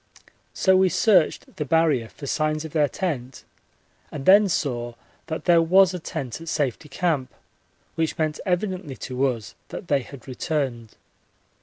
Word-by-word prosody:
So 190 -1 +4
we 190 0 +4
searched 185 -1 +2
the 150 - -1
Barrier 150 -6 +2
for 140 - -11
signs 155 +2 -1
of 160 - -7
their 150 -2 +2
tent 135 -9 -4 0.7
and 140 -2 -6
then 200 +1 +7
saw 120 -7 -2 0.3
that 160 - -5
there 170 -2 +5
was 185 +3 +5
a 180 - -4
tent 150 -4 -5
at 165 - -7
Safety 145 -1 -2
Camp, 150 -3 -1 0.6
which 160 +1 -1
meant 155 -2 -1
evidently 185 -5 -2
to 130 +2 -1
us 115 -6 -4
that 180 - -8
they 140 -2 +3
had 125 +1 -12
returned. 130 -5 -3
155 Hz, 155 wpm, -24 LUFS, 130-175 Hz, 0.7 s, then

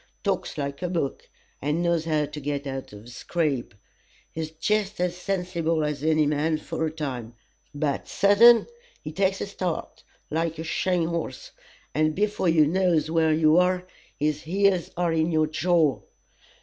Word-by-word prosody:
Talks 195 -5 -2
like 140 +1 -4
a 180 - -2
book, 165 -6 -3 0.3
and 150 +5 0
knows 170 -2 +1
how 155 -2 +1
to 150 +1 -8
get 145 0 -3
out 135 -1 -5
of 105 0 -11
a - - -15
scrape, 135 - -2 0.6
is 160 -1 -4
jest 210 +5 -1
as 180 -1 0
sensible 175 -4 -1
as 150 -1 -3
any 155 -1 +3
man 150 +2 +1
for 160 +1 -3
a - - -4
time, 130 -7 -5 0.4
but, 145 -1 -1
sudden, 225 +4 +6 0.4
he 155 - -5
takes 190 +3 0
a - - -1
start, 185 -4 -4 0.3
like 165 +1 -1
a 160 - -4
shying 175 +1 0
horse, 170 -1 -4 0.4
and 155 0 +1
before 205 -2 +1
you 160 -2 +5
knows 170 -1 +1
where 160 -1 +3
you 155 +1 +4
are, 180 0 +2 0.3
his 150 0 0
heels 190 +1 +1
are 175 -2 +1
in 160 +1 +1
your 155 -1 +3
jaw. 155 -2 +1
160 Hz, 165 wpm, -25 LUFS, 150-180 Hz, 0.6 s, sudden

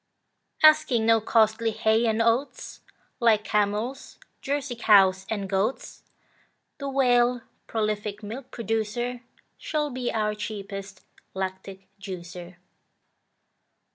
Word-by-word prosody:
Asking 305 -7 +5
no 225 0 +4
costly 220 +1 +2
hay 220 +1 +2
and 225 +1 +1
oats, 235 +5 -1 0.4
Like 225 -3 +3
camels, 210 +5 -2 0.2
Jersey 280 -2 -2
cows, 195 -4 +4
and 205 -3 -3
goats, 195 +6 -2 0.8
The 280 -1 -4
Whale, 245 -2 +3 0.3
prolific 215 -1 -2
milk 240 +5 -7
producer, 230 +2 -3 0.4
Should 300 -3 -2
be 250 -1 -2
our 210 -1 0
cheapest 200 -2 -7 0.3
lactic 190 0 -6
juicer. 180 -2 -8
220 Hz, 100 wpm, -26 LUFS, 200-245 Hz, 0.8 s, Asking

